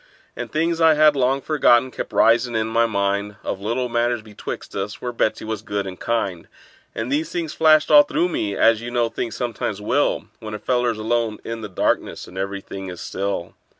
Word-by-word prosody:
And -, -, -6 dB
things 165 Hz, +2 st, 0 dB
I 160 Hz, -1 st, +6 dB
had 150 Hz, -1 st, +5 dB
long 135 Hz, +1 st, +1 dB
forgotten 130 Hz, -4 st, +3 dB
kept -, -, -6 dB
risin' 120 Hz, +1 st, +3 dB
in 110 Hz, 0 st, +1 dB
my 115 Hz, +1 st, +2 dB
mind, 100 Hz, -1 st, -1 dB
Of 95 Hz, -, -4 dB
little 120 Hz, +5 st, -1 dB
matters 120 Hz, -1 st, 0 dB
betwixt 105 Hz, -2 st, -8 dB
us, 100 Hz, +2 st, -4 dB
where 125 Hz, -, -4 dB
Betsey 110 Hz, -2 st, -1 dB
was 110 Hz, -2 st, -3 dB
good 100 Hz, -2 st, -3 dB
and 95 Hz, -1 st, -7 dB
kind; 100 Hz, -7 st, -2 dB, 0.5 s
And 115 Hz, +3 st, -3 dB
these 155 Hz, +3 st, 0 dB
things 170 Hz, -4 st, -3 dB
flashed 155 Hz, -1 st, +4 dB
all 150 Hz, -1 st, +10 dB
through 170 Hz, +4 st, 0 dB
me, 105 Hz, -, -2 dB
as 115 Hz, -1 st, +4 dB
you 120 Hz, -, -5 dB
know 120 Hz, -1 st, +1 dB
things 115 Hz, 0 st, -4 dB
sometimes 115 Hz, -4 st, -3 dB
will 105 Hz, -, 0 dB
When 110 Hz, -1 st, -6 dB
a -, -, -3 dB
feller's 120 Hz, +1 st, 0 dB
alone 110 Hz, 0 st, 0 dB
in 115 Hz, 0 st, -5 dB
the 105 Hz, -, -6 dB
darkness, 95 Hz, -, -1 dB
and 90 Hz, -, -13 dB
every 100 Hz, +1 st, -3 dB
thing 95 Hz, 0 st, -8 dB
is 90 Hz, -1 st, -8 dB
still. 100 Hz, -2 st, -3 dB
115 Hz, 205 wpm, -22 LUFS, 105-125 Hz, 0.5 s, all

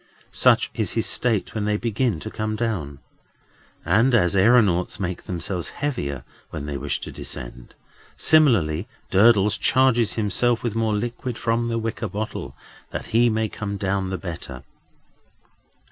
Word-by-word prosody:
Such -, -, +3 dB
is -, -, -2 dB
his -, -, 0 dB
state 115 Hz, -5 st, +1 dB
when 110 Hz, -2 st, -2 dB
they 105 Hz, 0 st, +1 dB
begin 115 Hz, -3 st, -1 dB
to 110 Hz, -, -6 dB
come 110 Hz, 0 st, -3 dB
down. 95 Hz, -12 st, -3 dB, 0.9 s
And 120 Hz, +4 st, +3 dB
as 90 Hz, -5 st, +3 dB
aëronauts 100 Hz, -3 st, +3 dB
make 90 Hz, -3 st, -4 dB
themselves 90 Hz, 0 st, -3 dB
heavier 70 Hz, -, -3 dB, 0.3 s
when 75 Hz, -2 st, -6 dB
they 75 Hz, -1 st, -4 dB
wish 70 Hz, +1 st, -2 dB
to -, -, -6 dB
descend, -, -, -9 dB, 0.4 s
similarly 110 Hz, -, +3 dB, 0.2 s
Durdles 105 Hz, 0 st, +4 dB
charges 130 Hz, -4 st, +3 dB
himself 115 Hz, +3 st, +1 dB
with 120 Hz, -3 st, -1 dB
more 110 Hz, -1 st, 0 dB
liquid 120 Hz, +2 st, -4 dB
from 115 Hz, 0 st, 0 dB
the 115 Hz, 0 st, -1 dB
wicker 115 Hz, -1 st, -3 dB
bottle, 105 Hz, +3 st, -5 dB, 0.3 s
that -, -, -5 dB
he 120 Hz, +1 st, +5 dB
may 110 Hz, 0 st, 0 dB
come 100 Hz, -1 st, -5 dB
down 95 Hz, -1 st, -1 dB
the 95 Hz, -, -3 dB
better. 85 Hz, -2 st, -7 dB
105 Hz, 145 wpm, -23 LUFS, 90-115 Hz, 0.9 s, he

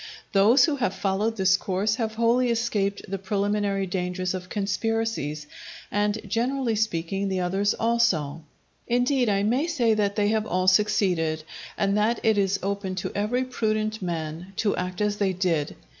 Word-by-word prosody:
Those 220 Hz, +6 st, +5 dB
who 305 Hz, -4 st, -1 dB
have 245 Hz, -, -1 dB
followed 210 Hz, +3 st, -1 dB
this 190 Hz, -1 st, +4 dB
course 195 Hz, +3 st, -1 dB
have 220 Hz, -2 st, -2 dB
wholly 235 Hz, +2 st, +2 dB
escaped 215 Hz, -4 st, 0 dB
the 195 Hz, +1 st, -4 dB
preliminary 200 Hz, 0 st, 0 dB
dangers 180 Hz, 0 st, -2 dB
of 180 Hz, -1 st, -6 dB
conspiracies, 205 Hz, -6 st, -2 dB, 0.5 s
and, 205 Hz, +1 st, 0 dB
generally 245 Hz, +1 st, 0 dB
speaking, 195 Hz, -2 st, -1 dB
the 190 Hz, -1 st, -1 dB
others 195 Hz, +3 st, +1 dB
also; 190 Hz, -11 st, +1 dB, 0.5 s
indeed, 245 Hz, 0 st, +2 dB
I 200 Hz, -1 st, +1 dB
may 250 Hz, +9 st, +1 dB
say 245 Hz, -10 st, +2 dB
that 205 Hz, -2 st, 0 dB
they 205 Hz, -1 st, +2 dB
have 220 Hz, 0 st, 0 dB
all 185 Hz, +1 st, 0 dB
succeeded, 180 Hz, -5 st, +2 dB, 0.3 s
and 200 Hz, 0 st, +1 dB
that 220 Hz, +3 st, +2 dB
it 220 Hz, -2 st, +3 dB
is 195 Hz, 0 st, +1 dB
open 195 Hz, -1 st, -2 dB
to 185 Hz, -, -3 dB
every 220 Hz, +5 st, 0 dB
prudent 215 Hz, -3 st, -1 dB
man 170 Hz, +1 st, -4 dB
to 205 Hz, 0 st, +1 dB
act 180 Hz, +1 st, -4 dB
as 210 Hz, 0 st, 0 dB
they 195 Hz, -2 st, +1 dB
did. 170 Hz, -5 st, -1 dB
205 Hz, 160 wpm, -25 LUFS, 185-225 Hz, 0.5 s, Those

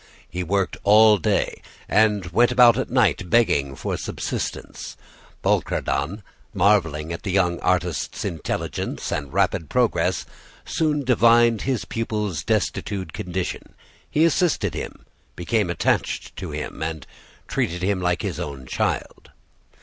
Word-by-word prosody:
He 90 Hz, -, -4 dB
worked 95 Hz, +1 st, -1 dB
all 105 Hz, 0 st, +6 dB
day -, -, 0 dB, 0.3 s
and 105 Hz, -3 st, +3 dB
went 120 Hz, +7 st, +4 dB
about 120 Hz, -2 st, +7 dB
at 130 Hz, -, -2 dB
night 110 Hz, -8 st, +2 dB
begging 85 Hz, -13 st, +2 dB
for -, -, -3 dB
subsistence. -, -, -5 dB, 0.5 s
Bouchardon, 80 Hz, +10 st, 0 dB, 0.3 s
marveling 85 Hz, -5 st, +2 dB
at 85 Hz, -, -6 dB
the 100 Hz, -, -5 dB
young 90 Hz, -2 st, +1 dB
artist's 90 Hz, -2 st, -1 dB
intelligence 80 Hz, -, -3 dB
and 70 Hz, -2 st, -3 dB
rapid 80 Hz, -, 0 dB
progress, -, -, +1 dB, 0.4 s
soon 150 Hz, -3 st, 0 dB
divined 120 Hz, -2 st, +4 dB
his 130 Hz, -3 st, -1 dB
pupil's 105 Hz, -6 st, -3 dB
destitute 95 Hz, -5 st, -1 dB
condition; 90 Hz, 0 st, -4 dB, 0.3 s
he 155 Hz, +2 st, +3 dB
assisted 170 Hz, 0 st, +1 dB
him, -, -, -7 dB, 0.3 s
became 105 Hz, +2 st, 0 dB
attached 85 Hz, -, -1 dB
to -, -, -6 dB
him, -, -, -6 dB
and 80 Hz, -2 st, -4 dB, 0.4 s
treated 90 Hz, +2 st, -2 dB
him 95 Hz, -1 st, 0 dB
like 90 Hz, -1 st, 0 dB
his -, -, -3 dB
own 70 Hz, -3 st, -6 dB
child. -, -, -3 dB
95 Hz, 125 wpm, -23 LUFS, 85-115 Hz, 0.5 s, about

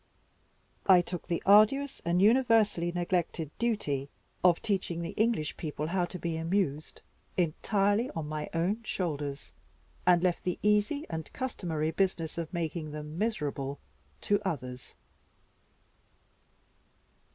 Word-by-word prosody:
I 185 Hz, -2 st, +8 dB
took 175 Hz, 0 st, -6 dB
the 170 Hz, -, -1 dB
arduous 215 Hz, +8 st, +5 dB
and 175 Hz, +2 st, +2 dB
universally 220 Hz, -7 st, +4 dB
neglected 175 Hz, -3 st, -1 dB
duty 145 Hz, -, -1 dB, 0.3 s
of 175 Hz, -2 st, +5 dB
teaching 185 Hz, -5 st, -1 dB
the 170 Hz, -, -4 dB
English 220 Hz, -9 st, 0 dB
people 150 Hz, -2 st, -4 dB
how 175 Hz, +2 st, 0 dB
to 180 Hz, -, -7 dB
be 170 Hz, -2 st, -3 dB
amused 165 Hz, -3 st, -1 dB, 0.3 s
entirely 200 Hz, +6 st, +1 dB
on 160 Hz, -2 st, -3 dB
my 150 Hz, 0 st, -4 dB
own 180 Hz, +7 st, 0 dB
shoulders, 145 Hz, -, -3 dB, 0.6 s
and 175 Hz, -1 st, +5 dB
left 180 Hz, -2 st, +1 dB
the 180 Hz, -1 st, -1 dB
easy 210 Hz, +8 st, +2 dB
and 160 Hz, -2 st, -5 dB
customary 165 Hz, -11 st, -2 dB
business 170 Hz, -2 st, -1 dB
of 165 Hz, -2 st, -4 dB
making 165 Hz, -2 st, -3 dB
them 150 Hz, +2 st, -7 dB
miserable 145 Hz, -10 st, -2 dB, 0.4 s
to 205 Hz, 0 st, +1 dB
others. 125 Hz, -9 st, -5 dB
175 Hz, 120 wpm, -30 LUFS, 155-205 Hz, 0.6 s, I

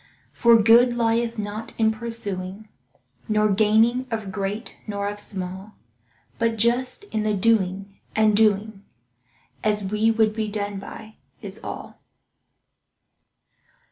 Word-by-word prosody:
For 235 Hz, -1 st, +5 dB
good 235 Hz, +2 st, +5 dB
lieth 230 Hz, 0 st, +1 dB
not 210 Hz, +1 st, -5 dB
in 220 Hz, -1 st, +3 dB
pursuing, 215 Hz, -3 st, -5 dB, 0.6 s
Nor 215 Hz, 0 st, +3 dB
gaining 220 Hz, +5 st, +3 dB
of 220 Hz, -4 st, -4 dB
great 200 Hz, +3 st, -4 dB
nor 200 Hz, -1 st, -2 dB
of 205 Hz, 0 st, -5 dB
small, 190 Hz, +1 st, -4 dB, 0.6 s
But 230 Hz, -1 st, +1 dB
just 245 Hz, -, +1 dB
in 220 Hz, -, 0 dB
the 215 Hz, -1 st, 0 dB
doing, 195 Hz, -2 st, 0 dB, 0.2 s
and 215 Hz, -1 st, +4 dB
doing 210 Hz, -1 st, +1 dB, 0.8 s
As 210 Hz, -1 st, +1 dB
we 210 Hz, +3 st, +1 dB
would 220 Hz, -1 st, +2 dB
be 220 Hz, -1 st, -2 dB
done 205 Hz, -1 st, -4 dB
by, 215 Hz, +2 st, -11 dB, 0.3 s
is -, -, -7 dB
all. -, -, -8 dB
215 Hz, 120 wpm, -23 LUFS, 205-225 Hz, 0.8 s, For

